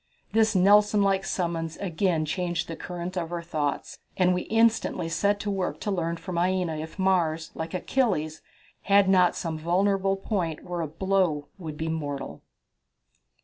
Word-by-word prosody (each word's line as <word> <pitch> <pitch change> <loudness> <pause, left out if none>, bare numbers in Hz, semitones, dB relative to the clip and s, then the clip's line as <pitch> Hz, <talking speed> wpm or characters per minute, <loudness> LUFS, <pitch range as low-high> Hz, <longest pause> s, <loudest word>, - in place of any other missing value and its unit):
This 220 -1 +3
Nelson 205 +2 +5
like 195 -1 +2
summons 165 -3 -2
again 175 -3 0
changed 175 0 -2
the 165 - -5
current 175 +2 -6
of 170 -2 -3
our 170 -1 -3
thoughts, 155 -4 -3 0.2
and 180 -1 +4
we 180 - -2
instantly 225 -6 +2
set 200 +5 +1
to 205 - -2
work 190 -2 -2
to 205 - -2
learn 170 -3 -1
from 175 0 -4
Aina 180 -3 0
if 160 +4 -7
Mars, 170 -4 +1
like 160 +3 -5
Achilles, 180 - 0 0.5
had 200 -1 +6
not 180 -2 +4
some 160 -2 -3
vulnerable 195 +3 +1
point 180 -6 -2
where 175 -1 -4
a 160 - -2
blow 170 -2 0
would 155 -4 -6
be 160 - -3
mortal. 145 -4 -4
180 Hz, 160 wpm, -26 LUFS, 160-195 Hz, 0.5 s, had